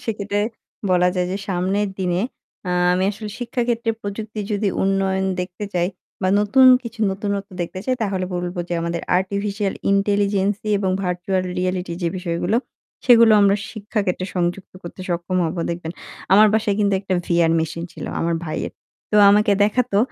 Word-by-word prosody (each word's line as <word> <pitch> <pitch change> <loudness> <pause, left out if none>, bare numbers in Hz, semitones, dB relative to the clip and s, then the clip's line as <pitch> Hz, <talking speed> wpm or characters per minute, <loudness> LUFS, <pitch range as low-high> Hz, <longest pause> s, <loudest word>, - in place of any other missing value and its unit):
সেক্ষেত্রে 205 -2 -2 0.5
বলা 180 0 +4
যায় 180 -1 +1
যে, - - -1
সামনের 190 +3 0
দিনে 180 0 0 0.5
আ - - 0 0.2
আমি 185 +1 +1
আসলে 210 +1 -7
শিক্ষাক্ষেত্রে 235 -1 -1
প্রযুক্তি 210 +1 -5
যদি 205 0 +1
উন্নয়ন 190 0 +1 0.2
দেখতে 180 +3 -5
চাই 175 0 +1 0.3
বা 185 - +2
নতুন 260 +6 +5 0.2
কিছু 230 -1 -8
নতুনত্ব 200 +1 -3
দেখতে 180 +2 -6
চাই 260 - +1
তাহলে 195 -3 -1
বলবো 175 +1 -3
যে 175 - -1
আমাদের 170 0 -2 0.2
আর্টিফিশিয়াল 200 +1 -2 0.2
ইন্টেলিজেন্স 200 0 +2
দিয়ে 210 -1 +1
এবং 190 -2 0
ভার্চুয়াল 180 +1 -1 0.2
রিয়েলিটি 180 -1 -2
যে 170 - +2
বিষয়গুলো 180 +3 -1 0.5
সেগুলো 230 -3 +7
আমরা 200 0 +4 0.2
শিক্ষা 215 0 -3
ক্ষেত্রে 185 0 -2
সংযুক্ত 180 +1 -2
করতে 175 +2 -9
সক্ষম 175 +1 -2
হবো 170 +1 -3
দেখবেন। 170 -1 -4 0.4
আমার 210 +2 +8
বাসায় 210 -2 +1
কিন্তু 200 -1 +2
একটা 195 -1 -2
VR 170 -1 +3
মেশিন 165 +1 -3
ছিলো। - - -7
আমার 170 0 0
ভাইয়ের। 155 - -4 0.4
তো 210 - +2
আমাকে 205 0 +4
দেখাতো 215 -1 +1
195 Hz, 160 wpm, -21 LUFS, 180-210 Hz, 0.5 s, আমার